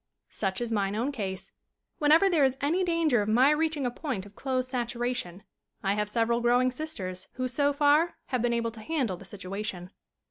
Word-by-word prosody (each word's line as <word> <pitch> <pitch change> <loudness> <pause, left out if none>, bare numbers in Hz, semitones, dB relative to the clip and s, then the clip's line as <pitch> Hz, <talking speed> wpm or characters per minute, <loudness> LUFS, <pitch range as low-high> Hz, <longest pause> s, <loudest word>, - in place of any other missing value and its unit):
Such 195 +1 -2
is 240 -1 -2
mine 200 -2 0
own 245 +6 0
case. 195 -8 -5 0.5
Whenever 310 +6 +5
there 335 -6 +3
is 265 -1 +2
any 330 +7 +1
danger 330 -9 +2
of 205 - -2
my 255 +6 +5
reaching 305 -2 0
a 245 - 0
point 245 - -4
of 205 - -14
clothes 255 -1 -1
saturation 240 -6 -3 0.4
I 195 0 +2
have 210 0 -1
several 235 +2 +1
growing 245 +2 +3
sisters 225 -11 -5
who, 255 0 -2
so 285 +3 +2
far, 295 +4 +3
have 255 -3 0
been 240 0 +1
able 230 -1 0
to 225 -1 -11
handle 250 - -1
the 195 - -13
situation. 190 -1 -6
245 Hz, 190 wpm, -28 LUFS, 210-285 Hz, 0.5 s, Whenever